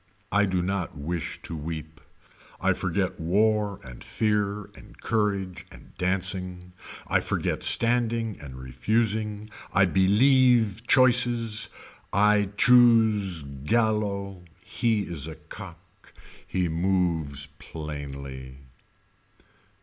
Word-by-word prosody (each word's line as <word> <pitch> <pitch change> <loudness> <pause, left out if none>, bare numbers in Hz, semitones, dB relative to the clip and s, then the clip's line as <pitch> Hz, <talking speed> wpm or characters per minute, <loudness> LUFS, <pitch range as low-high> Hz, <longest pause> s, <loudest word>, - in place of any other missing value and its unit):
I 105 0 +3
do 90 -2 0
not 95 -4 -3
wish 80 +3 -4
to 85 - -6
weep. 80 0 -7 0.6
I 95 +1 +2
forget 95 +1 -2
war 105 +4 +1
and 60 -2 -11
fear 105 -1 -1
and - - -16
courage 100 -4 -2
and - - -16
dancing. 90 -1 -2 0.3
I - - +2
forget - - -2
standing 115 -2 +2
and 70 -4 -10
refusing. 105 - -1 0.2
I 100 - +4
believe 110 +3 +3
choices. 120 -4 +3 0.4
I 105 0 +3
choose 110 - +4
Gallo. 100 - -1 0.2
He 115 -3 0
is 85 -6 -4
a 80 - -7
cock. 85 +3 -13 0.3
He 90 -2 -1
moves 85 -5 0
plainly. 70 -4 -8
95 Hz, 100 wpm, -26 LUFS, 80-110 Hz, 0.6 s, I